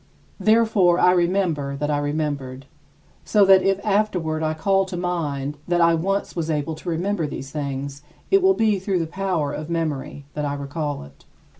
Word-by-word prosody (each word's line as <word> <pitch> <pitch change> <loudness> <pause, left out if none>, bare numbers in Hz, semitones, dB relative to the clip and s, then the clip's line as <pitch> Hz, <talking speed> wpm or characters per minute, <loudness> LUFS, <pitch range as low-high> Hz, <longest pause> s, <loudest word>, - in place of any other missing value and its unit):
Therefore, 215 -6 +4
I 180 - +5
remember 170 -6 +1
that 150 +2 -2
I 145 - +1
remembered, 145 -3 -3 0.6
so 205 -2 +4
that 190 -1 +7
if 195 +1 +1
afterward 185 -7 0
I 155 0 0
call 195 +4 +2
to 185 -1 -6
mind 150 -5 -2
that 175 0 +1
I 170 0 +5
once 195 +5 -1
was 165 -2 -2
able 155 +1 -1
to 155 +3 -7
remember 175 0 -1
these 135 -1 -7
things 140 -1 -4 0.3
it 390 0 +5
will 380 +1 +4
be 215 -3 +2
through 190 0 -1
the 165 - 0
power 175 -4 -2
of 155 +1 -6
memory 150 -4 -3
that 150 - -3
I 145 -1 -1
recall 145 - -4
it. 70 0 -17
165 Hz, 180 wpm, -23 LUFS, 145-190 Hz, 0.6 s, that